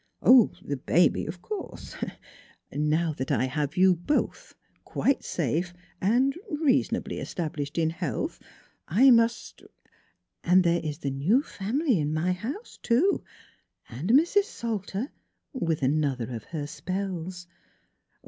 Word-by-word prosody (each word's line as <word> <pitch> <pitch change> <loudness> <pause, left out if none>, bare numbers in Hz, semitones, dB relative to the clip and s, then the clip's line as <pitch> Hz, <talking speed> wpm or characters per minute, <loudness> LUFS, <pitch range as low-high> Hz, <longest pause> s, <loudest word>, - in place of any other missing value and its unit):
" - - -48
Oh, 250 -4 +7
the 140 - -3
baby, 165 +5 +2
of 175 +3 -7
course 425 -2 -7 0.8
now 155 +2 +1
that 130 -2 -4
I - - +2
have 145 +3 -2
you 185 0 +6
both 175 - -2 0.3
quite 275 - 0
safe 170 +4 -1 0.3
and 250 +8 +3
er 370 -2 -6
reasonably 295 -4 +1
established 150 -4 -4
in 160 -1 +2
health 165 - -3 0.5
I 255 +10 +6
must 230 0 +2 0.3
" - - -36
" - - -54
And 180 +2 +5
there 170 -1 +2
is 150 -2 -3
the 140 -4 -3
new 180 - +2
family 230 - 0
in 150 0 -1
my 170 +4 +1
house, 250 - -6
too, 295 +12 +2 0.7
and 135 - -5
Mrs. 340 - +4
Salter, 225 - -4 0.4
with 165 - -1
another 130 -4 0
of 115 -3 -6
her 155 -3 -4
spells." 180 +1 -4
180 Hz, 140 wpm, -27 LUFS, 150-240 Hz, 0.8 s, Oh